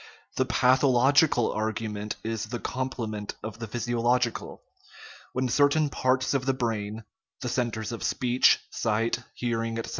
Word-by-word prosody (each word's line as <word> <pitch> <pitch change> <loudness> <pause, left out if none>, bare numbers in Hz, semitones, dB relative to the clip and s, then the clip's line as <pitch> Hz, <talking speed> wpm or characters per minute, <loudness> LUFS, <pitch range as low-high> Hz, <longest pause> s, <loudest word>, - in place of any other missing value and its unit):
The - - +2
pathological 130 +1 +4
argument 110 -1 -3
is 110 -1 -2
the 120 +3 -4
com 130 +2 -3
plement 110 -4 -5
of 110 +1 -6
the 115 - -5
physiological; 120 +1 -1 0.7
when 130 0 0
certain 145 +3 +3
parts 130 +1 +1
of 135 -1 -1
the 135 - +2
brain 110 -3 -3 0.4
(the 125 - -2
centres 115 -3 -2
of 115 - -6
speech, 125 0 +3
sight, 115 +1 0 0.2
hearing, 115 -2 -2
etc.) 115 - -4
120 Hz, 140 wpm, -27 LUFS, 110-130 Hz, 0.7 s, pathological